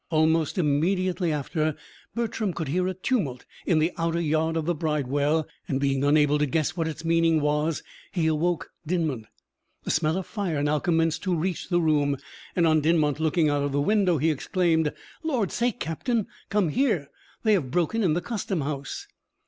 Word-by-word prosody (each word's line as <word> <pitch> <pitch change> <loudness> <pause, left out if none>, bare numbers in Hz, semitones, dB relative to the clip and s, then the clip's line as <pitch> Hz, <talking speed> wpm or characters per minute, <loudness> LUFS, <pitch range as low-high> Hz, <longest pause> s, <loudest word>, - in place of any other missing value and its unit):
Almost 160 0 +2
immediately 175 +3 +1
after, 155 +1 -1 0.4
Bertram 220 -4 -1
could 160 -4 -4
hear 180 +5 +1
a 185 - -2
tumult 180 - -1 0.2
in 170 - +3
the 160 +3 +2
outer 165 0 0
yard 160 0 +1
of 160 - -1
the 175 - +1
bridewell, 150 0 0 0.2
and, 135 - 0
being 135 -1 +1
unable 150 0 +4
to 150 - +2
guess 155 +4 0
what 165 -2 -1
its 160 0 -6
meaning 165 -1 +3
was, 150 +1 0 0.3
he 170 -4 0
awoke 160 +2 0
Dinmont. 155 -9 -1 0.6
The - - -2
smell 160 +1 +1
of 190 - -3
fire 175 -9 -2
now 150 +1 +2
commenced 165 0 +1
to 185 -3 0
reach 175 +2 -2
the 175 -2 +3
room, 145 -4 +2 0.4
and, 175 - +3
on 155 -1 +4
Dinmont 155 -2 +2
looking 160 0 +2
out 145 -1 +1
of 140 -1 -1
the 145 - +1
window, 190 0 +3
he 160 +3 +2
exclaimed: 160 0 +1 0.3
"Lord's 260 - -1
sake, 240 0 0
captain! 215 - -1 0.2
come 200 -4 +2
here; 190 - 0 0.3
they 220 -2 +4
have 160 -11 +1
broken 175 - 0
in 180 -7 +3
the 175 - 0
custom 195 -5 -2
house!" 140 -1 -4
160 Hz, 180 wpm, -26 LUFS, 150-180 Hz, 0.6 s, unable